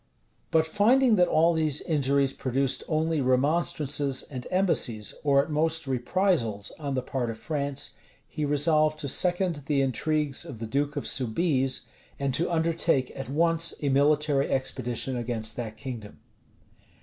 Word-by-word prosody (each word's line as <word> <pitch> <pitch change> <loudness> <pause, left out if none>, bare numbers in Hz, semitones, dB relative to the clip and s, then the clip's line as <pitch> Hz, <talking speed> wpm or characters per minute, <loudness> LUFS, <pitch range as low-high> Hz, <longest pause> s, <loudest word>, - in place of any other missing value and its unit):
But 160 -1 +3
finding 225 +8 +3
that 180 -1 +4
all 165 +2 +3
these 155 -3 +1
injuries 140 -3 +1
produced 135 0 -1
only 160 -1 0
remonstrances 140 0 +1
and 130 -3 -8
embassies, 140 - +1
or 140 -2 +4
at 155 - -8
most 160 +1 0
reprisals, 130 - 0
on 140 -3 -3
the 130 - -1
part 125 -2 -3
of 115 - -5
France, 140 +2 -3 0.4
he 155 - -5
resolved 155 +1 +2
to 145 - -3
second 175 +1 0
the 145 -2 +1
intrigues 145 +2 0
of 130 - -9
the 115 - -5
duke 140 +5 -1
of 145 - -3
Soubize, 130 +1 0 0.4
and 140 -1 -1
to 170 - 0
undertake 165 -5 0
at 135 -1 -6
once 165 +3 +2
a 140 - +1
military 145 0 +2
expedition 130 -1 -2
against 115 -2 -3
that 110 -3 -5
kingdom. 120 -6 -8
140 Hz, 150 wpm, -27 LUFS, 130-160 Hz, 0.4 s, that